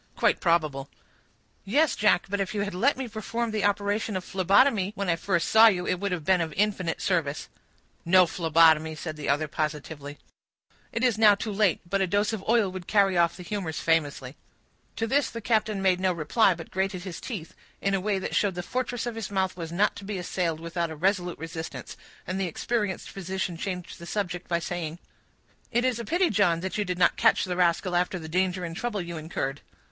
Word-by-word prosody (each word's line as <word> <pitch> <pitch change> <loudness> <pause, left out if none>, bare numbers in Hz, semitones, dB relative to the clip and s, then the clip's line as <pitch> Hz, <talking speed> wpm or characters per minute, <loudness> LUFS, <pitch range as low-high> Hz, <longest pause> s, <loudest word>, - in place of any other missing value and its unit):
"Quite - - +2
probable." 155 -6 +1 0.7
"Yes, 285 +10 +2
Jack, 210 -4 +3
but 200 +1 -2
if 195 +2 -2
you 205 - 0
had 200 -1 -3
let 250 +11 +2
me 265 -1 -4
perform 230 +1 -3
the 215 -2 -1
operation 205 0 0
of 185 - -5
phlebotomy 195 +2 +3
when 200 -2 -2
I - - +2
first 170 0 0
saw 220 +1 +8
you, 180 -5 +2
it 180 - -1
would 200 0 -2
have 170 -4 -3
been 185 -2 +3
of 160 -1 -2
infinite 195 -4 0
service." 160 -6 -1 0.5
"No 185 +1 +6
phlebotomy," 160 -2 +3
said 155 0 -6
the 150 -2 -5
other, 145 +2 +1
positively. 150 -1 -4 0.7
"It 230 - -2
is 240 -4 +2
now 210 -2 +7
too 215 +1 -4
late; 200 -3 +2
but 195 +2 0
a 190 - +2
dose 205 +4 +1
of 205 -3 -4
oil 225 -5 +3
would 185 -2 -8
carry 200 -3 +3
off 170 0 +2
the 180 - -8
humors 180 -5 -4
famously." 145 -5 0 0.6
To 225 - -1
this 275 +5 +1
the 230 - -6
captain 215 -3 0
made 185 -1 +3
no 185 0 +2
reply, 175 +5 +2
but 165 0 -10
grated 190 -1 -2
his 185 -4 -7
teeth, 195 -10 -6 0.3
in 195 - 0
a 195 - +1
way 205 0 0
that 190 - -4
showed 200 -3 +1
the 180 - -4
fortress 245 +2 -3
of 240 - -3
his 225 -3 -5
mouth 190 -2 -1
was 165 -2 -6
not 195 +5 +2
to - - -9
be 200 0 -4
assailed 175 -2 -2
without 170 0 -3
a 160 - -6
resolute 180 +1 0
resistance; 165 +1 -7 0.3
and 185 +1 -3
the 190 - 0
experienced 205 +3 -2
physician 190 -1 -4
changed 180 +1 -5
the 170 - -9
subject 180 -3 -3
by 170 - +1
saying,— 170 -1 -4 0.7
"It 240 +1 +1
is 250 -2 0
a 235 - -5
pity, 350 - +2
John, 180 -5 +2
that 190 +3 -3
you - - +2
did 180 -1 -3
not 180 - +3
catch - - +4
the 180 -1 -2
rascal, 180 +1 +1
after 180 +1 +1
the 160 -2 -8
danger 180 +2 0
and 165 -1 -6
trouble 235 +1 -3
you 170 -1 -6
incurred." 145 -3 -4
185 Hz, 215 wpm, -27 LUFS, 170-205 Hz, 0.7 s, saw